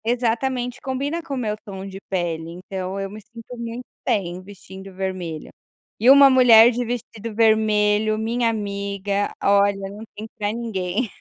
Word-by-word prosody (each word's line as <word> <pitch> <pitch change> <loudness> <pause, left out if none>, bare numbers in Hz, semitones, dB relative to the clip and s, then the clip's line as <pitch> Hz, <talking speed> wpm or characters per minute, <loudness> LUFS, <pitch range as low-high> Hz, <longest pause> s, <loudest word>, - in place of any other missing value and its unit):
Exatamente, 245 +2 -1
combina 280 +5 -3
com 290 -4 -5
o - - -4
meu 215 -4 -2
tom 195 -1 -8
de 195 0 -8
pele, 170 -3 -2
então 190 +1 -5
eu 195 - -3
me 210 +2 -10
sinto 230 +3 -12
muito 235 +1 -6 0.2
bem 180 -3 -1
vestindo 190 0 -12
vermelho. 185 -5 -5 0.5
E 235 +4 +4
uma 280 +1 +9
mulher 245 -3 +7
de 245 +1 -2
vestido 230 -2 -6
vermelho, 215 -1 +3
minha 230 +2 0
amiga, 200 -1 -2
olha, 200 0 +4
não 210 +2 -9
tem 215 +1 -6
pra 205 0 0
ninguém. 220 -1 -2
215 Hz, 155 wpm, -22 LUFS, 195-235 Hz, 0.5 s, uma